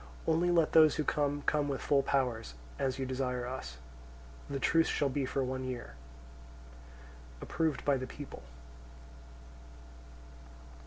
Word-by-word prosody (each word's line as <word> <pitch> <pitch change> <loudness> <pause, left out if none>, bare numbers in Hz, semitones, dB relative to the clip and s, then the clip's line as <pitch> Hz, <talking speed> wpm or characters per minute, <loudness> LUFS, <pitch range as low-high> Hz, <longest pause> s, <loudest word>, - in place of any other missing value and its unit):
Only 165 +2 +2
let 170 -3 +3
those 155 -2 +7
who 155 - 0
come 145 -1 0
come 150 -1 +1
with 140 -2 -2
full 140 -1 +3
powers, 125 - -1 0.2
as 130 -1 0
you 135 - -2
desire 125 -1 -2
us. 65 - -6 0.7
The 140 -1 -2
truce 165 +4 +3
shall 145 - +1
be 135 0 -1
for 135 +1 -1
one 130 0 -3
year. 125 -2 -5 1.5
Approved 160 -3 -1
by 140 -1 +3
the 130 0 -5
people. 145 +1 -9
135 Hz, 135 wpm, -32 LUFS, 130-150 Hz, 1.5 s, those